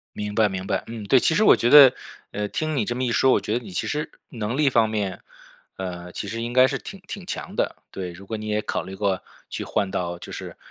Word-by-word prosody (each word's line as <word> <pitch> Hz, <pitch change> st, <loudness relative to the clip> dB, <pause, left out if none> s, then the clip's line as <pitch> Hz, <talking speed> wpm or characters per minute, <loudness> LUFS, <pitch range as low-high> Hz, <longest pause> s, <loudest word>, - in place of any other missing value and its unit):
明 105 Hz, 0 st, -4 dB
白 110 Hz, -1 st, +4 dB
明 95 Hz, -1 st, -5 dB
白。 -, -, -1 dB
嗯， 115 Hz, -2 st, -7 dB
对， 125 Hz, +6 st, +5 dB
其 160 Hz, -, +2 dB
实 215 Hz, -, +3 dB
我 -, -, +7 dB
觉 120 Hz, -, +1 dB
得， 140 Hz, -3 st, +10 dB, 0.4 s
呃， 105 Hz, 0 st, -2 dB
听 155 Hz, +6 st, -2 dB
你 -, -, +1 dB
这 120 Hz, -, -3 dB
么 130 Hz, -, -1 dB
一 120 Hz, -, 0 dB
说， 130 Hz, -, +4 dB
我 -, -, +3 dB
觉 105 Hz, -, -4 dB
得 125 Hz, -, -13 dB
你 100 Hz, -, -9 dB
其 90 Hz, -, -2 dB
实 150 Hz, +1 st, -2 dB, 0.2 s
能 115 Hz, 0 st, -3 dB
力 150 Hz, -1 st, +4 dB
方 115 Hz, -4 st, +3 dB
面， 105 Hz, -3 st, -3 dB, 0.5 s
呃， 90 Hz, -2 st, -6 dB
其 -, -, -5 dB
实 115 Hz, +3 st, -4 dB
应 120 Hz, +1 st, -3 dB
该 130 Hz, +1 st, +6 dB
是 135 Hz, 0 st, -2 dB
挺 195 Hz, -, -10 dB
挺 200 Hz, -, -7 dB
强 -, -, -5 dB
的。 -, -, -1 dB
对， 90 Hz, -2 st, -5 dB
如 95 Hz, +3 st, -13 dB
果 110 Hz, -, -3 dB
你 110 Hz, 0 st, -6 dB
也 105 Hz, 0 st, +1 dB
考 -, -, -2 dB
虑 95 Hz, -, -8 dB
过， 95 Hz, -2 st, 0 dB, 0.3 s
去 -, -, -5 dB
换 100 Hz, -, -1 dB
到 90 Hz, -2 st, -3 dB
就 -, -, -9 dB
是 -, -, -7 dB
110 Hz, 285 characters per minute, -24 LUFS, 95-130 Hz, 0.5 s, 得